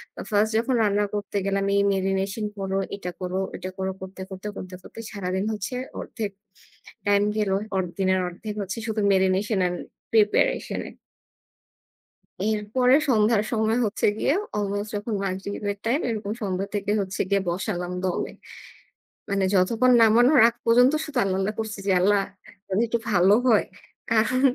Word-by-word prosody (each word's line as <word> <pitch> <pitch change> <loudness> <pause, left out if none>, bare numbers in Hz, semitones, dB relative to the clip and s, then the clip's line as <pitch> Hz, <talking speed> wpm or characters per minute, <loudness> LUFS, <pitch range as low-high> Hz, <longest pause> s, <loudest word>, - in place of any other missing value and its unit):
তো - - -10
First 210 +2 +3
যখন 245 +3 +1
রান্না 205 0 +2
করতে 205 -1 -4
গেলাম 195 0 0
এই 200 - +4
marination 195 +2 -1
করো, 195 0 -2 0.2
এটা 190 -3 -6
করো, 180 +1 -2 0.2
ওটা 185 - -5
করো, 190 0 -2
করতে 190 0 -8
করতে, 190 +1 -7
করতে 185 0 -7
করতে - - -12
সারাদিন 190 -1 -2
হচ্ছে 210 +4 -4 0.3
অর্ধেক 215 -4 -4 0.8
time 205 0 +4
গেলো। 200 -2 +1 0.2
অর 190 - +2 0.2
দিনের 190 0 +2
অর্ধেক 205 +4 -6
হচ্ছে 195 +2 -4
শুধু 220 -1 -1
marination 190 +2 +2
and 175 - -3 0.4
preparation 210 -2 +2
এ। - - -12 1.6
এরপরে 220 +4 +2
সন্ধ্যার 215 -2 +3
সময় 220 +1 +1
হচ্ছে 210 - -1
গিয়ে 275 - +2 0.2
almost 205 0 -2
যখন 210 +2 -3
মাগরিবের 200 +2 -3
time, 260 +8 +1
এরকম 210 -3 -3
সন্ধ্যা 195 -1 -2
থেকে 205 0 -1
হচ্ছে 190 -1 -3
গিয়ে 200 0 +2
বসালাম 180 0 -3
দমে। 185 -2 -1 1.0
মানে 200 -1 +1
যতক্ষণ 225 +7 +3
নামানোর 240 +6 +6
আগ 235 - -4
পর্যন্ত 245 +3 +5
শুধু 280 -5 -4
আল্লাহ্, 190 -1 0
আল্লাহ্ 205 +3 -1
করছি 220 -1 -5
যে, - - +2
"আল্লাহ্ 200 +1 +3 0.4
যদি 195 +4 +1
একটু 235 - 0
ভালো 190 0 +5
হয়।" 225 -4 +5 0.5
কারণ 230 +3 +2
205 Hz, 155 wpm, -25 LUFS, 190-220 Hz, 1.6 s, নামানোর